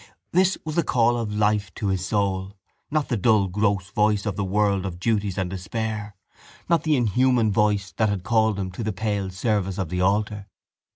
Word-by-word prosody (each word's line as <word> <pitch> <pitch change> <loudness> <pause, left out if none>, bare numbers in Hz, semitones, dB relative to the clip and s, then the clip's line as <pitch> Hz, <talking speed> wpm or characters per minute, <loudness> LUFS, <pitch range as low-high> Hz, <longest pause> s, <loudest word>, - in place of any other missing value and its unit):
This 185 +2 +3
was 155 - -3
the 170 - +2
call 120 -5 +2
of 115 -3 -3
life 105 -2 +1
to 100 - -2
his 95 -2 -1
soul 100 -1 -1 0.3
not 150 -1 -1
the 120 - +1
dull 105 -1 +3
gross 100 0 0
voice 105 -1 +1
of 105 - -2
the 100 - -2
world 100 0 +1
of 90 -3 -5
duties 105 -2 0
and 95 -2 0
despair, 105 +2 -4 0.5
not 170 -2 +3
the 155 -1 +2
inhuman 120 -1 +2
voice 100 -2 +1
that 110 -1 +2
had 100 -3 -2
called 110 -1 +2
him 95 -2 -3
to 90 - -5
the 110 -1 -2
pale 100 -1 -2
service 95 -1 -1
of 95 -5 -2
the 90 +1 -2
altar. 105 +1 0
105 Hz, 195 wpm, -24 LUFS, 95-110 Hz, 0.5 s, This